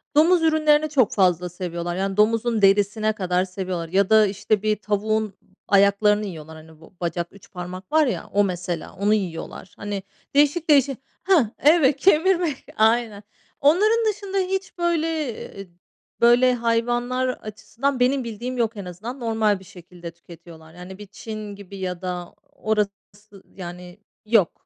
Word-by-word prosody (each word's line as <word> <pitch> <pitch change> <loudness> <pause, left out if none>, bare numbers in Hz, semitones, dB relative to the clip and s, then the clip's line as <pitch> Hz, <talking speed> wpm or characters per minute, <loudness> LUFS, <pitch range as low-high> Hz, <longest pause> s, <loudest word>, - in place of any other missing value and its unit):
domuz 335 +3 +5
ürünlerini 310 -1 +3
çok 255 -5 +2
fazla 180 -5 +2
seviyorlar, 175 -1 -5
yani 195 +1 -2
domuzun 225 +1 +2
derisine 205 +2 +3
kadar 185 -2 0
seviyorlar, 185 -3 -5
ya 195 +2 +2
da, 215 -1 +6
işte, 205 +1 -1
bir 215 0 +2
tavuğun 215 0 -1 0.3
ayaklarını 205 +1 +3
yiyorlar, 160 -4 -8
hani, 160 0 -16
bu - - -17
bacak 170 0 -2
3 200 - -18
parmak 185 +2 -8
var 310 -1 +4
ya, - - -3
o, 205 0 +4
mesela 175 -3 -4
onu 205 +3 +1
yiyorlar, 185 -2 -4
hani, 205 -2 -5 0.3
değişik, 295 +3 +2
değişik 275 -3 +4 0.3
hah 330 - +3
evet, 295 -2 +4
kemirmek. 345 -2 +2
Aynen, 220 -2 +2 0.4
onların 425 +10 +3
dışında, 395 -1 -6
hiç, 380 0 -2
böyle, 340 -2 0 0.5
eee, 195 -1 -8 0.5
böyle, 245 +2 +5
hayvanlar 240 +2 0
açısından 235 +4 -4
benim 260 +1 +2
bildiğim 235 +3 -5
yok 225 -2 -1
en 195 - -6
azından. 220 +9 -7
Normal 220 -4 +1
bir - - -15
şekilde 175 -1 -11
tüketiyorlar. 165 -1 -15
Yani 180 +2 -10
bir 210 -1 -11
Çin 215 0 -8
gibi, 200 -1 -11
ya 180 -1 -4
da 180 -1 -5 0.2
orası 210 -2 0 0.6
yani 180 +1 -9 0.3
yok. 215 -5 +3
210 Hz, 150 wpm, -23 LUFS, 185-255 Hz, 0.6 s, da